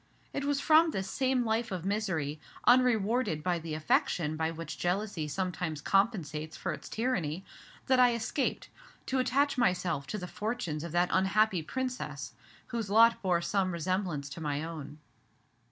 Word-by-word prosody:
It 280 Hz, -, -2 dB
was 285 Hz, -1 st, +1 dB
from 315 Hz, +3 st, +5 dB
this 190 Hz, -10 st, -3 dB
same 260 Hz, 0 st, +1 dB
life 225 Hz, +1 st, 0 dB
of 180 Hz, -2 st, -4 dB
misery, 185 Hz, -8 st, -1 dB, 0.3 s
unrewarded 235 Hz, -7 st, +3 dB
by 180 Hz, -2 st, +1 dB
the 160 Hz, -1 st, -5 dB
affection 155 Hz, 0 st, +1 dB
by 160 Hz, +1 st, 0 dB
which 165 Hz, -1 st, -6 dB
jealousy 180 Hz, -3 st, -1 dB
sometimes 165 Hz, 0 st, -2 dB
compensates 160 Hz, -5 st, 0 dB
for -, -, -2 dB
its -, -, -9 dB
tyranny, 195 Hz, -8 st, -1 dB, 0.4 s
that 260 Hz, -1 st, +3 dB
I 245 Hz, -1 st, +6 dB
escaped, 235 Hz, +5 st, -2 dB, 0.4 s
to 265 Hz, -, 0 dB
attach 275 Hz, +2 st, +2 dB
myself 180 Hz, -, +1 dB
to 215 Hz, -, -3 dB
the 180 Hz, -, -5 dB
fortunes 180 Hz, -7 st, -3 dB
of 170 Hz, -, -5 dB
that 175 Hz, +1 st, +3 dB
unhappy 190 Hz, 0 st, +3 dB
Princess 255 Hz, +9 st, -4 dB, 0.4 s
whose 230 Hz, -4 st, -3 dB
lot 230 Hz, +3 st, +5 dB
bore 175 Hz, -3 st, +1 dB
some 190 Hz, -1 st, +1 dB
resemblance 170 Hz, -3 st, -1 dB
to 155 Hz, +4 st, -8 dB
my 145 Hz, -1 st, -2 dB
own. 150 Hz, -3 st, -7 dB
190 Hz, 155 wpm, -30 LUFS, 160-235 Hz, 0.4 s, I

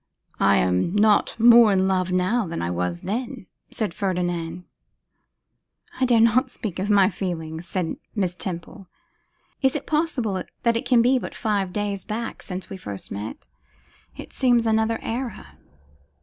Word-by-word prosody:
'I -, -, +4 dB
am 90 Hz, -, +1 dB
not 210 Hz, +2 st, +3 dB
more 235 Hz, -1 st, +8 dB
in 190 Hz, -1 st, +2 dB
love 185 Hz, -1 st, 0 dB
now 185 Hz, +4 st, +1 dB
than 165 Hz, -, -4 dB
I 85 Hz, -, -2 dB
was 90 Hz, 0 st, -2 dB
then,' 225 Hz, 0 st, -4 dB, 0.2 s
said 215 Hz, -7 st, -2 dB
Ferdinand. 175 Hz, -2 st, -2 dB, 1.4 s
'I 260 Hz, -, +3 dB
dare 240 Hz, -2 st, +4 dB
not 230 Hz, +3 st, +4 dB
speak 215 Hz, -7 st, -6 dB
of 195 Hz, +3 st, -2 dB
my 200 Hz, -2 st, +5 dB
feelings,' 170 Hz, -3 st, -4 dB
said 180 Hz, -3 st, -2 dB, 0.2 s
Miss 185 Hz, -4 st, 0 dB
Temple. 180 Hz, +2 st, -7 dB, 0.7 s
'Is 265 Hz, 0 st, +2 dB
it 290 Hz, -, -3 dB
possible 260 Hz, -, -1 dB, 0.2 s
that 235 Hz, -1 st, +3 dB
it 230 Hz, -, -2 dB
can 240 Hz, -3 st, +5 dB
be 255 Hz, +2 st, +3 dB
but -, -, -7 dB
five 205 Hz, -5 st, -1 dB
days 200 Hz, -1 st, -3 dB
back 225 Hz, +2 st, -5 dB
since 185 Hz, -1 st, -6 dB
we -, -, -7 dB
first 100 Hz, -, -8 dB
met! 105 Hz, +3 st, -6 dB, 0.7 s
It -, -, -9 dB
seems 245 Hz, -3 st, +3 dB
another 220 Hz, 0 st, +2 dB
era. 240 Hz, 0 st, -5 dB
200 Hz, 155 wpm, -24 LUFS, 180-230 Hz, 1.4 s, more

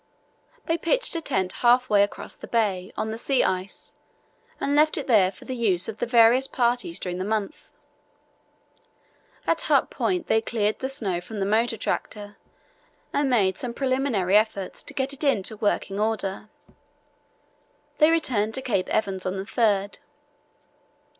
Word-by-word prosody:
They 330 Hz, +1 st, 0 dB
pitched -, -, 0 dB
a 330 Hz, -, -2 dB
tent 190 Hz, -, -1 dB
half 245 Hz, +1 st, +4 dB
way 205 Hz, -3 st, +4 dB
across 205 Hz, -, -2 dB
the -, -, -11 dB
bay, 200 Hz, -5 st, 0 dB
on 220 Hz, -, -2 dB
the 225 Hz, -, -5 dB
sea 270 Hz, +1 st, +1 dB
ice, 185 Hz, +1 st, -3 dB, 0.7 s
and 280 Hz, -, -1 dB
left 305 Hz, +1 st, +4 dB
it 295 Hz, -, -3 dB
there 200 Hz, -7 st, +4 dB
for 185 Hz, -, -16 dB
the 260 Hz, -, -4 dB
use 200 Hz, -7 st, +1 dB
of 220 Hz, -, -7 dB
the -, -, -1 dB
various 240 Hz, +2 st, +5 dB
parties 240 Hz, -9 st, 0 dB
during 180 Hz, -1 st, -4 dB
the -, -, -2 dB
month. 215 Hz, +7 st, -2 dB, 1.9 s
At -, -, +1 dB
Hut -, -, +2 dB
Point 360 Hz, -2 st, -1 dB
they 220 Hz, -, +2 dB
cleared 215 Hz, -2 st, -1 dB
the 265 Hz, -, -3 dB
snow 195 Hz, -10 st, -1 dB
from 210 Hz, +4 st, -8 dB
the 195 Hz, -, 0 dB
motor 225 Hz, +3 st, +1 dB
tractor 205 Hz, -1 st, -4 dB, 0.8 s
and 285 Hz, -1 st, +1 dB
made 195 Hz, -7 st, +2 dB
some 240 Hz, -1 st, -5 dB
preliminary 255 Hz, -8 st, 0 dB
efforts 210 Hz, -3 st, +1 dB
to -, -, -6 dB
get 270 Hz, +1 st, -1 dB
it 280 Hz, -, -6 dB
into 220 Hz, -7 st, +1 dB
working 205 Hz, -2 st, -1 dB
order. 210 Hz, -2 st, -2 dB, 1.5 s
They 305 Hz, 0 st, +6 dB
returned 235 Hz, -10 st, +1 dB
to 265 Hz, -, -2 dB
Cape 195 Hz, -8 st, -1 dB
Evans 190 Hz, -3 st, -1 dB
on 185 Hz, +1 st, -2 dB
the 190 Hz, -, -3 dB
3rd. 205 Hz, -2 st, 0 dB
220 Hz, 160 wpm, -25 LUFS, 195-255 Hz, 1.9 s, They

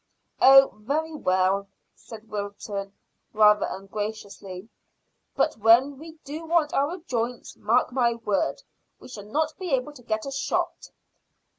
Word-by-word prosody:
"Oh, 270 Hz, 0 st, +8 dB
very 305 Hz, +8 st, -2 dB
well," 190 Hz, -5 st, +1 dB, 0.3 s
said 225 Hz, -1 st, -13 dB
Wilton, 200 Hz, -1 st, -5 dB, 0.4 s
rather 210 Hz, -1 st, +5 dB
ungraciously; 195 Hz, -1 st, -6 dB, 0.7 s
"but -, -, +1 dB
when 240 Hz, +6 st, +4 dB
we 320 Hz, +1 st, -10 dB
do 305 Hz, +4 st, -7 dB
want 325 Hz, -2 st, +1 dB
our 290 Hz, +6 st, 0 dB
joints, 245 Hz, -7 st, -4 dB
mark 235 Hz, +4 st, +1 dB
my 240 Hz, -2 st, +1 dB
words, 210 Hz, -4 st, -1 dB, 0.4 s
we -, -, -13 dB
shall 205 Hz, -4 st, -9 dB
not 310 Hz, +7 st, -1 dB
be 370 Hz, -2 st, -4 dB
able 270 Hz, +1 st, -1 dB
to 270 Hz, -, -14 dB
get 220 Hz, -2 st, -3 dB
a 275 Hz, -, -5 dB
shot." 275 Hz, -, -2 dB
230 Hz, 135 wpm, -25 LUFS, 205-280 Hz, 0.7 s, Oh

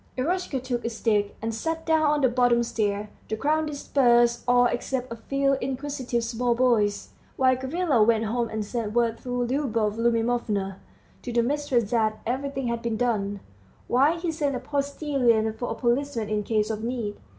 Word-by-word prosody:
Eroshka 315 Hz, 0 st, -1 dB
took 245 Hz, -1 st, -3 dB
a 230 Hz, -, -1 dB
stick, 210 Hz, -3 st, 0 dB
and 225 Hz, 0 st, -1 dB
sat 325 Hz, +8 st, -3 dB
down 320 Hz, -1 st, +3 dB
on 295 Hz, -1 st, +2 dB
the 260 Hz, -, +5 dB
bottom 245 Hz, -1 st, +3 dB
stair. 210 Hz, -2 st, -2 dB, 0.2 s
The 220 Hz, -, -1 dB
crowd 310 Hz, +5 st, +1 dB
dispersed, 240 Hz, -5 st, +2 dB
all 245 Hz, 0 st, +5 dB
except 250 Hz, +1 st, -2 dB
a -, -, -3 dB
few 275 Hz, +4 st, 0 dB
inquisitive 260 Hz, -2 st, -2 dB
small 235 Hz, +1 st, 0 dB
boys, 230 Hz, -5 st, +2 dB, 0.3 s
while 260 Hz, -1 st, +4 dB
Gavrila 270 Hz, 0 st, 0 dB
went 225 Hz, 0 st, +3 dB
home 235 Hz, +1 st, -1 dB
and 215 Hz, -1 st, -3 dB
sent 215 Hz, -1 st, -3 dB
word 230 Hz, -1 st, +1 dB
through 245 Hz, -1 st, -2 dB
Liubov 230 Hz, -5 st, 0 dB
Liubimovna 230 Hz, -4 st, 0 dB, 0.4 s
to 245 Hz, -, -5 dB
the 235 Hz, 0 st, +2 dB
mistress 260 Hz, -5 st, 0 dB
that 220 Hz, -2 st, +1 dB
everything 270 Hz, +2 st, -2 dB
had 235 Hz, 0 st, -2 dB
been 230 Hz, -2 st, -2 dB
done, 205 Hz, -4 st, -1 dB, 0.4 s
while 285 Hz, +7 st, +3 dB
he 340 Hz, -1 st, -1 dB
sent 295 Hz, -4 st, -1 dB
a -, -, -2 dB
postilion 275 Hz, -5 st, 0 dB
for 245 Hz, +2 st, -4 dB
a -, -, -2 dB
policeman 240 Hz, -1 st, -1 dB
in 210 Hz, -1 st, 0 dB
case 215 Hz, +1 st, 0 dB
of 215 Hz, 0 st, -4 dB
need. 230 Hz, -4 st, -3 dB
240 Hz, 175 wpm, -26 LUFS, 225-270 Hz, 0.4 s, the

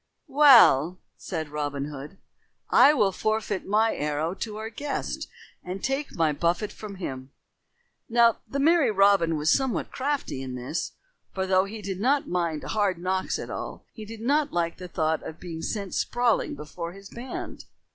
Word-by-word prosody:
"Well," 230 Hz, -, +6 dB, 0.2 s
said 160 Hz, -4 st, -5 dB
Robin 145 Hz, -1 st, -3 dB
Hood, 145 Hz, +5 st, -8 dB, 0.5 s
"I 290 Hz, -, +8 dB
will 210 Hz, -10 st, +2 dB
forfeit 215 Hz, -1 st, -2 dB
my 220 Hz, +3 st, +3 dB
arrow 150 Hz, +3 st, -1 dB
to 210 Hz, +2 st, -5 dB
our 220 Hz, +1 st, -5 dB
guest 285 Hz, +5 st, -4 dB, 0.4 s
and 185 Hz, +2 st, -6 dB
take 270 Hz, +2 st, -2 dB
my 160 Hz, -3 st, +2 dB
buffet 170 Hz, +7 st, 0 dB
from 210 Hz, -2 st, -9 dB
him." 130 Hz, -8 st, -6 dB, 0.8 s
Now 235 Hz, -1 st, +4 dB
the 275 Hz, -, -2 dB
merry 310 Hz, -2 st, +4 dB
Robin 195 Hz, -5 st, +4 dB
was 150 Hz, +1 st, +2 dB
somewhat 265 Hz, -3 st, 0 dB
crafty 270 Hz, -, -2 dB
in 130 Hz, -1 st, -5 dB
this, 125 Hz, +6 st, -4 dB, 0.4 s
for, 190 Hz, -1 st, -1 dB
though 185 Hz, 0 st, +3 dB
he 210 Hz, +1 st, -8 dB
did 190 Hz, -1 st, -4 dB
not 275 Hz, +6 st, +2 dB
mind 170 Hz, -4 st, -1 dB
hard 205 Hz, -4 st, 0 dB
knocks 185 Hz, +2 st, -1 dB
at -, -, -7 dB
all, -, -, -6 dB
he 220 Hz, -, -9 dB
did 220 Hz, +1 st, -9 dB
not 285 Hz, +4 st, +1 dB
like 170 Hz, -1 st, -1 dB
the 180 Hz, -, -8 dB
thought 160 Hz, -2 st, 0 dB
of 160 Hz, -, -8 dB
being 165 Hz, -2 st, -7 dB
sent 200 Hz, -1 st, -4 dB
sprawling 240 Hz, -2 st, +1 dB
before 170 Hz, +3 st, -7 dB
his 195 Hz, +1 st, -13 dB
band. 245 Hz, +2 st, -7 dB
195 Hz, 165 wpm, -26 LUFS, 165-230 Hz, 0.8 s, I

